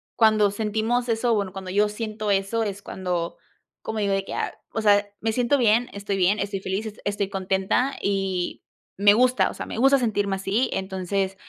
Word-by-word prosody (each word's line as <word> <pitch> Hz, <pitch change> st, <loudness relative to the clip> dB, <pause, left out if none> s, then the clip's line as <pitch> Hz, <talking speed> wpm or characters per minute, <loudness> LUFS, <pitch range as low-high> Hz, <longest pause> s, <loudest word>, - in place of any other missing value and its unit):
cuando 215 Hz, -3 st, +4 dB
sentimos 220 Hz, +4 st, -1 dB
eso, 230 Hz, +1 st, +2 dB
bueno, 200 Hz, -2 st, -1 dB
cuando 190 Hz, -1 st, -7 dB
yo 205 Hz, +2 st, +3 dB
siento 215 Hz, -1 st, -3 dB
eso, 195 Hz, +4 st, +1 dB
es 200 Hz, -2 st, -4 dB
cuando 180 Hz, -4 st, -3 dB, 0.4 s
como 220 Hz, -1 st, -4 dB
digo 200 Hz, -1 st, +1 dB
de 195 Hz, 0 st, 0 dB
que: -, -, -6 dB
"Ah, -, -, -2 dB, 0.2 s
o 225 Hz, -, -2 dB
sea, 205 Hz, -1 st, +4 dB
me 225 Hz, 0 st, 0 dB
siento 245 Hz, +4 st, +2 dB
bien, 235 Hz, -1 st, +3 dB
estoy 200 Hz, -1 st, -3 dB
bien, 195 Hz, +3 st, +2 dB
estoy 200 Hz, -1 st, -2 dB
feliz, 195 Hz, +4 st, -3 dB
es 210 Hz, -, -9 dB
estoy 200 Hz, -1 st, -1 dB
contenta", 195 Hz, +7 st, 0 dB
y, 195 Hz, -3 st, -1 dB, 0.3 s
me 205 Hz, +1 st, +6 dB
gusta, 255 Hz, +2 st, +3 dB
o -, -, -7 dB
sea, -, -, -5 dB
me -, -, -6 dB
gusta 270 Hz, +2 st, +5 dB
sentirme 205 Hz, -5 st, 0 dB
así, 195 Hz, +6 st, 0 dB
entonces, 190 Hz, 0 st, -2 dB
205 Hz, 195 wpm, -24 LUFS, 195-225 Hz, 0.4 s, me